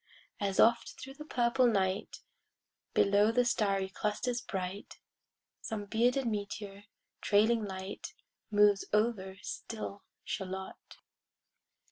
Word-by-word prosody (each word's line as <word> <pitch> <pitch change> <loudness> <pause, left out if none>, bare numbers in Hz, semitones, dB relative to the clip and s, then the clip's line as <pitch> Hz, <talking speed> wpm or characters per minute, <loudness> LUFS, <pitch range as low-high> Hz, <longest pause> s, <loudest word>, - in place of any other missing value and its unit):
As 200 -1 -1
often 235 +1 +4
thro' 270 - -8
the 300 +2 -10
purple 245 -2 +3
night, 195 -2 0 0.7
Below 205 +2 +4
the 245 +1 +3
starry 195 -4 +1
clusters 215 +5 -2
bright, 190 +1 -5 0.6
Some 215 -3 -4
bearded 245 +5 +2
meteor, 205 -2 -4 0.4
trailing 220 +2 +3
light, 190 0 -6 0.3
Moves 205 -1 +5
over 210 -3 +1
still 215 -3 -6 0.2
Shalott. 190 -1 -6
210 Hz, 100 wpm, -32 LUFS, 195-235 Hz, 0.7 s, Moves